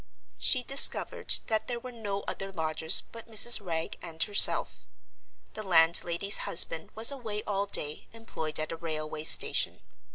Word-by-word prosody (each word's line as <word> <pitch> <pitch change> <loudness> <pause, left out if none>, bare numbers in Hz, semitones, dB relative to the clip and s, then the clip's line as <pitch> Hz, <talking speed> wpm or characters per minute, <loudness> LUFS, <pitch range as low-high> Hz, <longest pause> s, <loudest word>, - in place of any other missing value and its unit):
She 255 -2 +1
discovered 275 +2 +3
that 220 -1 -3
there 240 -1 -5
were 255 +1 -12
no 205 -4 -7
other 195 0 -8
lodgers 160 -1 -1
but 230 0 -14
Mrs. 225 0 +4
Wragge 165 -3 -6
and 165 -1 -4
herself. 205 -1 +1 0.7
The 215 - -8
landlady's 170 +1 +1
husband 165 -1 +4
was 225 +4 +4
away 220 -6 -8
all 200 0 -5
day, 150 -6 0
employed 160 -10 -4
at 155 - -6
a 165 - -8
railway 155 -2 -7
station. - - +3
195 Hz, 150 wpm, -26 LUFS, 160-225 Hz, 0.7 s, Mrs